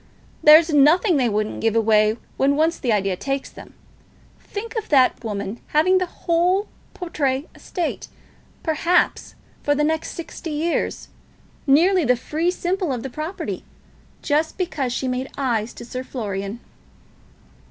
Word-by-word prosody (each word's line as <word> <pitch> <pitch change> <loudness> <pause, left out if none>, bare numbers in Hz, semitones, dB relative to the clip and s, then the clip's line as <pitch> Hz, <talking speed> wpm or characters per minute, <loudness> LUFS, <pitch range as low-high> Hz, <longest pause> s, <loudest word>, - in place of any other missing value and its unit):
"There's 315 +2 +8
nothing 315 +5 +5
they 250 -3 +2
wouldn't 215 0 -2
give 225 -1 +1
away 215 -1 +3 0.2
when 280 +1 +2
once 320 +3 +1
the 245 - 0
idea 195 -3 +1
takes 275 +7 -3
them. - - -13 0.6
Think 450 +4 -7
of 445 - -3
that 260 -4 +4
woman 205 0 -4 0.2
having 370 +4 +5
the 365 - -1
whole 355 +4 +1 0.3
Portray 290 -5 -2
estate, 350 -4 -4 0.6
perhaps 335 +3 +1 0.3
for 290 - +1
the 295 - +1
next 320 +1 -1
sixty 335 0 -7
years, 315 +3 -2 0.6
nearly 345 +6 +5
the 250 -2 +3
fee 310 +7 -1
simple 360 -2 -1
of 245 -2 -3
the 270 - -5
property, 310 - -5 0.6
just 310 +2 0
because 295 -8 -2
she 260 +2 -2
made 255 +1 -2
eyes 235 -5 -1
to - - -9
Sir 255 +2 -5
Florian!" 205 -3 -5
290 Hz, 140 wpm, -22 LUFS, 240-335 Hz, 0.6 s, There's